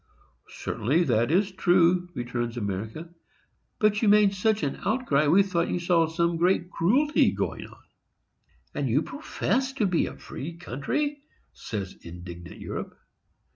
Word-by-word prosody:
"Certainly 145 +11 0
that 120 -4 +2
is 195 +5 +2
true," 180 -1 +3
returns 120 -1 -3
America; 110 - -4 0.6
"but 210 -1 +2
you 225 - +2
made 205 -1 +5
such 215 +2 +1
an 140 - -2
outcry, 155 - +1
we 185 +7 +6
thought 175 -3 -1
you - - 0
saw 170 -2 +3
some 170 +1 0
great 175 +1 +1
cruelty 265 - +3
going - - -3
on." - - -18 0.9
"And - - -1
you - - +2
profess 265 0 -2
to 240 -6 0
be 180 -3 +1
a - - -8
free 165 +4 -7
country!" 275 - -2 0.3
says 100 -4 -5
indignant 85 0 -10
Europe. - - -6
170 Hz, 140 wpm, -26 LUFS, 125-200 Hz, 0.9 s, we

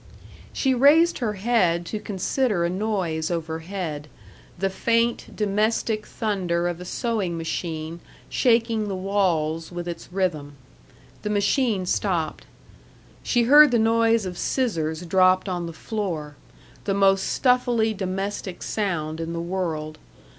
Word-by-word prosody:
She 265 -1 +1
raised 295 +7 +5
her 225 -5 -1
head 190 -5 +1
to 215 +5 -4
consider 210 -1 0
a 170 - -1
noise 185 -6 -1
overhead 165 -2 -4 0.5
the 195 +2 -1
faint, 230 +4 0
domestic 215 +1 0
thunder 180 -6 -1
of 175 0 -4
a - - -7
sewing 200 -5 -2
machine 165 0 -4 0.3
shaking 230 -3 +2
the 195 - -3
walls 175 -5 0
with 175 0 -5
its 170 0 -7
rhythm. 165 -7 -1 0.7
The 210 - -3
machine 210 -1 +1
stopped. 175 -4 -1 0.7
She 240 -1 +2
heard 295 +5 +8
the 245 - +2
noise 225 -1 +3
of 180 -1 -5
scissors 165 - -1
dropped 185 +2 +3
on 175 -2 -2
the - - -5
floor 165 -6 -4 0.5
the 195 - 0
most 195 -1 +4
stuffily 245 -3 +2
domestic 195 -1 -4
sound 165 -7 -2
in 165 0 -4
the 170 - -3
world. 170 -3 -3
190 Hz, 130 wpm, -24 LUFS, 170-220 Hz, 0.7 s, heard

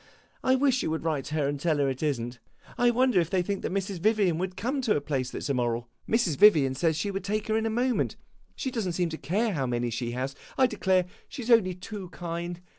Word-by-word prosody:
I 260 - +4
wish 265 -1 +2
you - - -1
would 160 0 -2
write 155 -5 -1
to 155 - -4
her 145 -3 +1
and 145 0 -2
tell 155 0 +1
her 140 -1 +2
it 135 -1 -3
is 145 -5 +1
n't. 120 +1 -6 0.4
I 245 - +4
wonder 245 -4 +3
if 165 -2 0
they 185 -1 +1
think 200 +1 -2
that - - -3
Mrs. 195 -1 -2
Vivian 200 -4 +2
would 185 0 -3
come 265 +7 -1
to 230 -5 +2
a - - +2
place 135 -3 -2
that - - -6
's - - -3
immoral. 120 -2 -1 0.2
Mrs. 220 - +2
Vivian 160 -10 +6
says 160 +4 +1
she 200 +4 -1
would 195 -1 -4
take 210 +2 -1
her 215 - +2
in 225 0 +1
a - - 0
moment; 245 +2 0 0.4
she 265 - -3
does 225 -6 -2
n't 175 - -2
seem 175 -1 +1
to 160 - -5
care 205 - 0
how 135 -6 -1
many 120 -1 -1
she 120 +1 -3
has. 130 +2 -3 0.2
I 265 - +6
declare, 190 -6 +2 0.2
she 265 - -6
's 240 - -1
only 190 -6 +5
too 190 0 -7
kind. 170 +1 -5
180 Hz, 265 wpm, -28 LUFS, 145-215 Hz, 0.4 s, Vivian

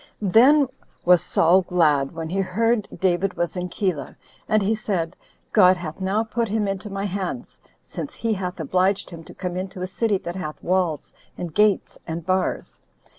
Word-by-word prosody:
Then 255 +9 +5 0.4
was 180 -1 +6
Saul 175 +1 +4
glad 155 -7 +2
when 165 -1 -5
he 190 +3 -1
heard 215 +4 +1
David 185 0 +1
was 175 +1 -2
in 180 0 -3
Keilah; 185 -6 -2 0.3
and 215 -1 +3
he 205 +3 +2
said, 190 -6 -2 0.4
"God 185 -3 +6
hath 170 0 -7
now 195 +4 +1
put 230 +1 -2
him 210 0 0
into 195 +2 -4
my 195 0 -3
hands, 200 +5 -4 0.2
since 285 - -7
he 230 -1 -1
hath 180 -3 -4
obliged 185 +5 +1
him 165 -1 -9
to - - -12
come 180 -1 -4
into 185 0 -5
a - - 0
city 200 +2 0
that 175 -1 -6
hath 155 -5 -6
walls, 175 -5 0 0.2
and 170 -3 -5
gates, 210 -2 +2
and 165 0 -4
bars." 185 0 -1
185 Hz, 175 wpm, -23 LUFS, 175-210 Hz, 0.4 s, was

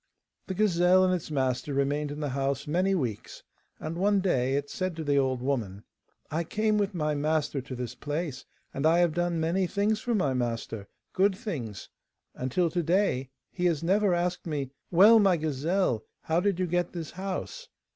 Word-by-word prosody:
The 190 - -3
gazelle 185 -2 +4
and 185 - +2
its 175 -3 -3
master 135 -1 -1
remained 145 +2 0
in 145 +1 -6
the 145 - -1
house 135 +1 -1
many 185 +6 +1
weeks, 120 - -4 0.4
and 155 +1 -5
one 200 +3 +2
day 135 -9 +1
it 140 0 -1
said 185 +2 -3
to 160 - -4
the 145 -1 +2
old 130 -2 0
woman, 110 -8 -2 0.5
'I 165 +3 -1
came 215 +3 +1
with 200 -1 -1
my 150 -2 0
master 150 -1 0
to 130 0 -7
this 125 -1 -5
place, 145 -1 -4 0.3
and 140 +3 +1
I 165 +1 +4
have 175 -2 +3
done 175 0 0
many 175 +4 +1
things 205 +3 +1
for 240 -2 -1
my 145 -10 +1
master, 115 -4 -3 0.3
good 190 0 +2
things, 135 - -5 0.5
and 130 0 -4
till 175 +2 +1
to 175 - 0
day 165 -6 +1 0.2
he 180 - -2
has 165 -3 0
never 195 +1 +3
asked 175 0 -2
me: 140 -4 -3 0.2
"Well, 205 +6 +7
my 195 -4 +4
gazelle, 155 - 0 0.2
how 160 +1 +1
did 195 -1 0
you 185 - +2
get 175 0 -1
this 165 -3 -5
house? 195 - -5
165 Hz, 190 wpm, -28 LUFS, 140-185 Hz, 0.5 s, Well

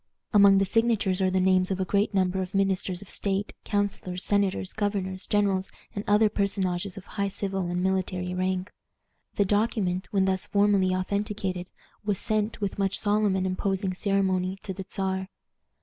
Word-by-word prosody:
Among 200 -1 +7
the 195 - +3
signatures 210 -3 +2
are 190 - +3
the 185 0 +1
names 185 0 +3
of 190 -1 -1
a 190 - 0
great 200 +2 +1
number 190 -1 +1
of 185 +2 -5
ministers 195 -1 0
of 200 - -17
state, 200 0 -1
counselors, 200 -3 -2
senators, 200 -2 0
governors, 200 -3 -2
generals, 200 -2 +1 0.2
and 200 - -4
other 210 +1 +5
personages 195 -2 -1
of 195 - -9
high 200 -1 -2
civil 195 -2 -2
and 175 +1 -1
military 185 -1 -1
rank. 185 0 -1 0.6
The 205 - +3
document, 205 -3 0
when 195 -2 +2
thus 190 -1 0
formally 200 -2 +3
authenticated, 190 -1 -2 0.4
was 205 -2 0
sent, 215 +1 -1
with 200 -1 -3
much 195 0 +1
solemn 205 -1 +2
and 190 0 0
imposing 190 0 -1
ceremony, 190 -1 0
to 190 - -4
the 190 0 -8
Czar. 190 -1 -2
195 Hz, 165 wpm, -27 LUFS, 185-205 Hz, 0.6 s, Among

